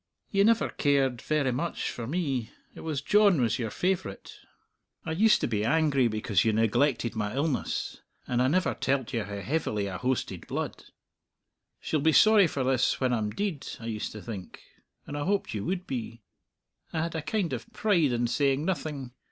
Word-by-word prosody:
"Ye 195 -1 +4
never 230 +1 +3
cared 135 -4 +1
verra 145 -4 0
much 165 +7 -2
for 115 -2 -6
me; 135 -7 -1 0.2
it - - -12
was 150 -4 -3
John 205 -4 +5
was 120 -1 +1
your 115 -2 -2
favourite. 175 - -2 0.7
I - - -3
used 210 +7 +4
to - - +1
be 105 -3 -1
angry 140 0 +3
because 110 -4 +1
you 110 - +3
neglected 115 +2 +1
my 105 0 -2
illness, 145 0 -2 0.3
and 125 0 +1
I 130 - +3
never 180 +6 +2
telled 130 -2 -1
you 115 -3 0
how 100 0 -6
heavily 110 -7 -1
I 95 -2 -4
hoasted 125 -8 -2
blood. - - -4 1.0
'She'll 155 - -1
be 160 +2 +3
sorry 215 -1 +7
for 140 -4 -2
this 130 -1 +2
when 130 -2 +1
I'm 110 -3 0
deid,' 185 - -3
I 115 - -9
used 110 -2 -3
to 105 - -9
think; 100 -6 -8 0.4
and 145 - -6
I 145 - -2
hoped 200 +4 0
you 105 -2 -3
would 185 -1 -2
be. 115 -3 -5 0.7
I 160 - -1
had 165 - -3
a 160 - -2
kind 170 0 -1
of 120 -2 -6
pride 175 -10 +2
in 120 0 +1
saying 135 +4 +1
nothing. 150 -8 -3
135 Hz, 185 wpm, -28 LUFS, 115-160 Hz, 1.0 s, sorry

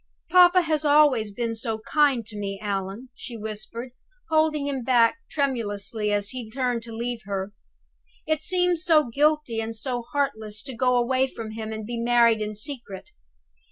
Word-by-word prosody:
"Papa 360 0 +7
has 310 -2 0
always 290 -8 +4
been 230 +2 -2
so 225 0 -3
kind 265 +1 +2
to 215 - -9
me, 200 -1 -4
Allan," 200 +4 -4
she 235 - -8
whispered, 220 +3 -5 0.4
holding 310 -2 +2
him 270 -3 -2
back 235 +2 +4
tremulously 220 -6 -2
when 205 0 +1
he 245 -1 -5
turned 245 -1 -1
to 230 0 -9
leave 235 +1 -4
her. 195 0 -3 0.7
"It 310 -1 0
seems 360 -1 +1
so 310 -7 +4
guilty 295 -3 +1
and 225 0 -4
so 245 +2 -3
heartless 220 -7 -1
to 265 - -6
go 250 +1 +2
away 255 +2 +2
from 225 -4 -7
him 220 0 -6
and 220 -1 -5
be 235 +1 -4
married 235 -2 +4
in 215 0 -3
secret. 225 -5 -6
235 Hz, 165 wpm, -25 LUFS, 220-280 Hz, 0.7 s, Papa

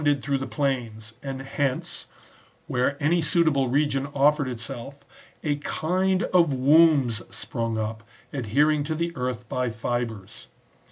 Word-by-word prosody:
223 145 -1 +3
ed 135 - -14
through 140 -1 +1
the - - -7
plains, 115 -6 -2
and 135 -1 -5
hence, 135 -1 -3 0.6
where 130 +3 0
any 165 +4 +2
suitable 155 -5 +2
region 140 0 +1
offered 145 0 +3
itself, 120 +2 -6 0.5
a 145 -2 0
kind 185 +6 0
of 170 -4 +5
wombs 135 -3 +4
sprung 115 0 -3
up,^ 110 0 -3 0.4
adhering 145 +5 +2
to 155 +2 -2
the 170 +1 -2
earth 125 -2 -3
by 125 +1 -1
fibres. 115 - -4
135 Hz, 135 wpm, -25 LUFS, 120-150 Hz, 0.6 s, of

